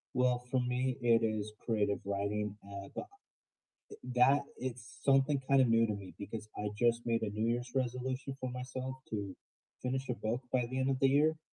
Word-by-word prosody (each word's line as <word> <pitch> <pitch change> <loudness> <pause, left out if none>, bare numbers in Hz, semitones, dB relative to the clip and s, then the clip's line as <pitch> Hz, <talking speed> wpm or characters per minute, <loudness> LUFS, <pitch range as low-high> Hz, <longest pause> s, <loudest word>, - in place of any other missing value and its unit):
Well, 125 -1 +2
for 130 - +3
me 125 +1 0
it 115 -1 +4
is 110 -1 -2
creative 105 -3 +1
writing, 100 +1 -1
uh, 100 0 -7
but - - -2
uh 400 +2 -21 0.9
that 135 +3 +5 0.2
is 125 -3 -4 0.2
something 135 0 +4
kind 135 -1 +6
of 125 - +3
new 115 0 +5
to 105 - -1
me 100 -2 -8
because 105 +1 -6
I 105 - -1
just 120 +1 +2
made 115 -1 +1
a 110 - 0
New 110 +2 -1
Year's 120 0 -5
resolution 130 +1 -2
for 130 -1 -3
myself 130 +1 -4
to 100 -3 -3 0.5
finish 130 +1 -1
a - - +1
book 115 +3 -2
by 125 -2 +2
the 130 - -2
end 130 +1 +2
of 130 - 0
the 135 - +6
year 155 +3 +4
125 Hz, 200 wpm, -34 LUFS, 110-130 Hz, 0.9 s, kind